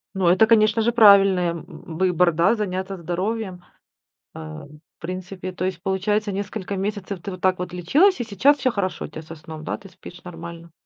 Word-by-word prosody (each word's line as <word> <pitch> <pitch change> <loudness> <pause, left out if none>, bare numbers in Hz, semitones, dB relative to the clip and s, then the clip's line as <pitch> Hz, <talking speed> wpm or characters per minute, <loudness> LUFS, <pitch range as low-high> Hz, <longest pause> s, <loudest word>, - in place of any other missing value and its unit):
Ну, 190 -2 +1
это, 185 +6 +5
конечно 225 0 +4
же, 235 +2 +2
правильное 195 -6 +6
в 165 -1 -10
выбор, 180 -2 +3
да, 170 +7 +3
заняться 190 -2 -3
здоровьем, 185 +2 -3 0.7
э, - - -9
в 80 - -9 0.3
принципе. 185 +1 -6
То 185 0 -4
есть 185 -2 -3
получается 205 +3 0
несколько 200 0 -4
месяцев 200 -1 -4
ты 200 - -6
вот 185 -1 -9
так 185 -1 +2
вот 180 0 -5
лечилась 295 - +3
и 240 - -1
сейчас 235 +7 +3
всё 255 -3 +1
хорошо 190 -4 -3
у - - -7
тя 155 +1 -9
со 165 +1 -10
сном, 155 0 -10
да, - - -3
ты 195 -2 -14
спишь 180 0 -13
нормально? 170 -1 -9
185 Hz, 195 wpm, -22 LUFS, 175-205 Hz, 0.7 s, правильное